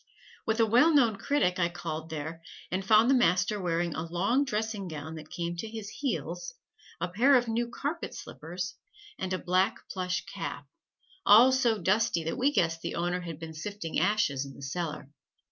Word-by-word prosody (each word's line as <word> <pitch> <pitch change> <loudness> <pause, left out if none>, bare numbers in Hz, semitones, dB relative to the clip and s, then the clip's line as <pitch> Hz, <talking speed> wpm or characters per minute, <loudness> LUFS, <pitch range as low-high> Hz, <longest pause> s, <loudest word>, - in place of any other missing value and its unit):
With 220 +1 +1
a 225 - +6
well 245 +9 +5
known 235 -7 +4
critic 190 -11 +1
I 170 -1 +2
called 160 -2 -5
there, 160 +1 -5 0.3
and 185 +1 -1
found 215 +3 +5
the 270 - +5
master 195 -3 +2
wearing 170 -1 0
a - - -3
long 215 +11 +2
dressing 215 -5 -2
gown 155 -1 -6
that 155 -1 -9
came 170 0 -3
to 225 - -4
his 215 -2 -6
heels, 290 - -4 0.4
a 180 - -1
pair 240 +10 +4
of 245 -1 +3
new 235 +1 0
carpet 290 +7 -4
slippers 180 +5 -6 0.5
and 185 - -3
a 185 - +1
black 185 +1 0
plush 185 -1 -2
cap, - - -6 0.6
all 230 +6 +8
so 245 -4 +2
dusty 205 -1 +1
that 165 +8 -3
we 275 +3 +3
guessed 165 - +1
the - - -4
owner 175 +1 -1
had 165 -3 -6
been 160 0 -8
sifting 165 +1 -4
ashes 180 -7 +1
in 135 -1 -10
the - - -11
cellar. 150 -1 -4
185 Hz, 185 wpm, -29 LUFS, 165-225 Hz, 0.6 s, all